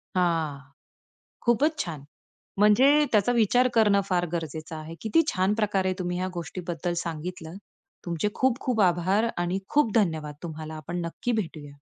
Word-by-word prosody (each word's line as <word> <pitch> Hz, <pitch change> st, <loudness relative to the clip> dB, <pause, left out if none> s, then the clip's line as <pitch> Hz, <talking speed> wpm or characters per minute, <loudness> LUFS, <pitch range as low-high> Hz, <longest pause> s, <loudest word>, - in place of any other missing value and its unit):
हां. 165 Hz, -5 st, +1 dB, 0.8 s
खूपच 285 Hz, +7 st, +2 dB
छान. 155 Hz, -6 st, -7 dB, 0.6 s
म्हणजे 210 Hz, +6 st, +6 dB, 0.2 s
त्याचा 215 Hz, +3 st, +3 dB
विचार 245 Hz, +2 st, +3 dB
करणं 210 Hz, -3 st, +4 dB
फार 175 Hz, -1 st, +1 dB
गरजेचं 160 Hz, -1 st, -4 dB
आहे. 155 Hz, +1 st, -8 dB
किती 225 Hz, +9 st, +3 dB
छान 190 Hz, +2 st, +1 dB
प्रकारे 195 Hz, -3 st, +1 dB
तुम्ही 180 Hz, 0 st, -2 dB
ह्या 185 Hz, -, -1 dB
गोष्टीबद्दल 175 Hz, 0 st, -4 dB
सांगितलं. 170 Hz, +1 st, -6 dB, 0.5 s
तुमचे 170 Hz, +4 st, -1 dB
खूप 260 Hz, -1 st, +1 dB
खूप 245 Hz, -4 st, 0 dB
आभार 190 Hz, +6 st, +1 dB
आणि 175 Hz, +2 st, -1 dB
खूप 290 Hz, -8 st, +2 dB
धन्यवाद 160 Hz, -8 st, +1 dB
तुम्हाला. 160 Hz, -1 st, -6 dB
आपण 170 Hz, +4 st, -5 dB
नक्की 240 Hz, +8 st, -3 dB
भेटूया. 145 Hz, -4 st, -11 dB
180 Hz, 140 wpm, -26 LUFS, 165-210 Hz, 0.8 s, म्हणजे